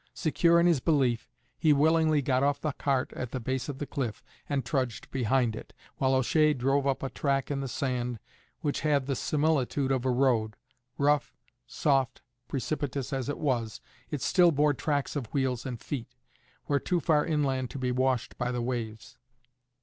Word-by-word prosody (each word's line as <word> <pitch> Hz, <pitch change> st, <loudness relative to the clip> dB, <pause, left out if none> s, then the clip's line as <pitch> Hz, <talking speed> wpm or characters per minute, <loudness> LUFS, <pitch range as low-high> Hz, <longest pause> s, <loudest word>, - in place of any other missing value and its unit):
Secure 170 Hz, +2 st, +3 dB
in 170 Hz, -, +4 dB
his 170 Hz, -5 st, +4 dB
belief, 130 Hz, -6 st, +1 dB, 0.3 s
he 155 Hz, -, +4 dB
willingly 155 Hz, 0 st, +3 dB
got 130 Hz, -1 st, +2 dB
off 145 Hz, +1 st, +2 dB
the 155 Hz, -, -1 dB
cart 135 Hz, -1 st, -1 dB
at 125 Hz, -, -4 dB
the 130 Hz, -, -4 dB
base 130 Hz, +2 st, -3 dB
of 140 Hz, -, -4 dB
the 145 Hz, -, -4 dB
cliff, 125 Hz, -6 st, -4 dB, 0.3 s
and 140 Hz, -4 st, -1 dB
trudged 130 Hz, -4 st, -2 dB
behind 125 Hz, -2 st, +1 dB
it, -, -, -10 dB, 0.2 s
while 130 Hz, 0 st, +2 dB
O'Shea 150 Hz, +4 st, +3 dB
drove 135 Hz, +2 st, +1 dB
up 135 Hz, -1 st, 0 dB
a 135 Hz, -, -1 dB
track 140 Hz, -1 st, -1 dB
in 140 Hz, -, -1 dB
the 135 Hz, -, -3 dB
sand 125 Hz, -2 st, -2 dB, 0.4 s
which 145 Hz, -3 st, -1 dB
had 145 Hz, -3 st, +1 dB
the 135 Hz, 0 st, -1 dB
similitude 145 Hz, -1 st, +1 dB
of 130 Hz, -2 st, +1 dB
a 130 Hz, -, +1 dB
road; 120 Hz, -4 st, +2 dB, 0.4 s
rough, 145 Hz, 0 st, +1 dB, 0.3 s
soft, 135 Hz, -4 st, 0 dB, 0.2 s
precipitous 140 Hz, -1 st, -3 dB
as 135 Hz, 0 st, -2 dB
it 145 Hz, -, -2 dB
was, 120 Hz, -7 st, -1 dB, 0.3 s
it 145 Hz, -4 st, -3 dB
still 175 Hz, -2 st, +5 dB
bore 150 Hz, 0 st, +3 dB
tracks 145 Hz, +1 st, -1 dB
of 130 Hz, -6 st, -4 dB
wheels 130 Hz, -3 st, 0 dB
and 120 Hz, -3 st, -5 dB
feet, 130 Hz, -6 st, -5 dB, 0.5 s
where 145 Hz, -1 st, +1 dB
too 180 Hz, +4 st, 0 dB
far 150 Hz, -2 st, +3 dB
inland 135 Hz, -5 st, 0 dB
to -, -, -7 dB
be 130 Hz, -1 st, -1 dB
washed 130 Hz, -1 st, 0 dB
by 125 Hz, 0 st, 0 dB
the 125 Hz, -, -2 dB
waves. 120 Hz, -3 st, -4 dB
135 Hz, 180 wpm, -29 LUFS, 125-145 Hz, 0.5 s, still